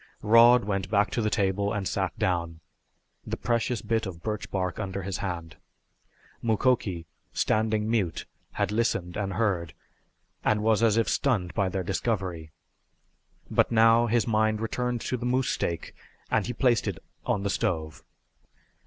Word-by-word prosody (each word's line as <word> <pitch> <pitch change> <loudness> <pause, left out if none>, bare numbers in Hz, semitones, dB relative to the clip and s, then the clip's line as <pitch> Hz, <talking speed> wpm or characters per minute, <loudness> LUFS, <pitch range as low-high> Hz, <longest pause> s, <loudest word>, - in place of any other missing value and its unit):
Rod 115 +2 +6
went 100 -2 -2
back 105 -1 +2
to 120 - -1
the 110 - +1
table 100 0 0
and 105 -4 -2
sat - - -2
down, 85 -3 -1 0.6
the - - -4
precious 120 -1 -1
bit 110 -2 0
of 85 -3 -9
birch 105 -1 -3
bark 90 -2 -2
under 100 -2 -4
his 95 0 -3
hand. 85 -5 -5 0.8
Mukoki, 110 -7 +1 0.3
standing 110 0 +1
mute, 110 -7 -1 0.3
had - - -1
listened 100 -6 0
and 100 -2 -2
heard, 90 -8 -1 0.7
and 105 0 +2
was 110 0 +3
as 115 -2 +4
if 115 - +2
stunned 100 -11 0
by 100 -2 +1
their 95 0 -2
discovery. 95 -5 -2 1.0
But - - +3
now 115 +1 +5
his 115 -2 +2
mind 110 -1 +1
returned 120 +2 -2
to 125 - -2
the 120 - -5
moose 130 +1 +1
steak, 85 -1 -2 0.4
and - - +1
he 125 - -3
placed 120 -2 +2
it 95 -5 -2 0.3
on 100 - 0
the 100 - 0
stove. 80 - -2
105 Hz, 155 wpm, -27 LUFS, 95-115 Hz, 1.0 s, Rod